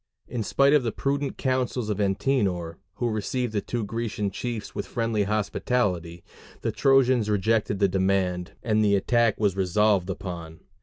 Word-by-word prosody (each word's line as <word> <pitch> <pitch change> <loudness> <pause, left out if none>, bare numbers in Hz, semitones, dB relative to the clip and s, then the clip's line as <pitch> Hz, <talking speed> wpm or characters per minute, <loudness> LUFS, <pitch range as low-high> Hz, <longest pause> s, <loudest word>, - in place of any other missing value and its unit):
In 120 -2 -3
spite 140 +6 +3
of 150 - +5
the 115 -2 -1
prudent 140 +3 -2
counsels 130 -4 -1
of 105 - -3
Antenor, 95 -5 0 0.2
who 120 +2 -1
received 110 +2 -2
the 105 - 0
two 120 +1 -3
Grecian 110 -1 -3
chiefs 115 +1 -5
with 100 - -4
friendly 115 -3 0
hospitality, 100 -4 -1 0.4
the - - -1
Trojans 130 -5 +3
rejected 105 0 +1
the 100 0 +3
demand, 95 -1 0
and 110 -2 +2
the 100 -1 +4
attack 115 +3 +2
was 100 -4 +2
resolved 95 0 +2
upon. 85 -4 -6
105 Hz, 155 wpm, -26 LUFS, 95-120 Hz, 0.4 s, of